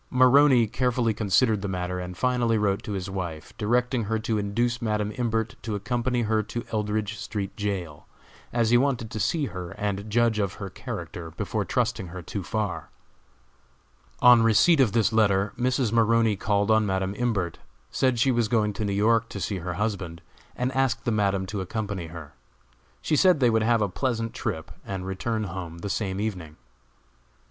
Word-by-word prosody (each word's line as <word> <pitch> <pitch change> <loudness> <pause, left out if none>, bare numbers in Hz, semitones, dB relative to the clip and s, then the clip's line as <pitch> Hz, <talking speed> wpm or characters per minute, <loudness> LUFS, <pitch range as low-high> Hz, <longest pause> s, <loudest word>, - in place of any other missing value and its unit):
Maroney 130 -1 +6
carefully 120 0 0
considered 105 +1 +2
the 100 - -3
matter, 90 -1 -3
and 90 0 -6
finally 125 -3 +1
wrote 100 -2 +1
to 105 - -5
his 95 -1 -3
wife, 90 -5 -6
directing 120 +2 +1
her 110 +2 0
to 110 0 -1
induce 120 +4 -1
Madam 105 -2 -1
Imbert 115 -2 -1
to 110 -2 -3
accompany 120 +4 -1
her 110 0 +1
to 120 +3 -5
Eldridge 105 0 -1
street 100 -3 -4
jail, 95 -8 -4 0.4
as 115 -1 +1
he 120 - +6
wanted 125 -5 0
to 110 - -4
see 155 +6 +1
her 90 -7 -6
and 100 0 -3
judge 115 0 +2
of 100 -3 0
her 100 -3 -7
character 85 -1 -6
before 80 - -3
trusting 95 - -1
her 90 +1 -8
too 100 - -5
far. 105 +2 -3 1.3
On 125 -1 +8
receipt 115 +9 +5
of 120 -7 +4
this 115 -1 +2
letter, 100 -2 +2
Mrs. 125 -1 0
Maroney 115 -1 +3
called 100 +1 +1
on 110 0 +4
Madam 95 -1 -1
Imbert, 100 -9 -1 0.3
said 130 -2 +1
she 130 +3 +3
was 120 -2 +1
going 105 -2 +1
to 105 - -4
New 100 - -1
York 115 +3 +2
to 100 - -6
see 95 +2 -2
her 90 0 -4
husband, 95 -6 -3 0.3
and 125 +1 -1
asked 130 -2 0
the 120 - +1
Madam 100 -3 +1
to 100 +1 -4
accompany 100 -2 -4
her. 80 -3 -10 0.7
She 155 - +1
said 180 0 +5
they 125 -3 +4
would 110 0 +2
have 115 0 +3
a - - +1
pleasant 115 +3 -2
trip, 80 0 -4
and 95 -2 -5
return 110 +4 -2
home 85 -3 -6
the 100 +4 -4
same 95 -3 -2
evening. 90 -8 -4
105 Hz, 180 wpm, -26 LUFS, 95-120 Hz, 1.3 s, On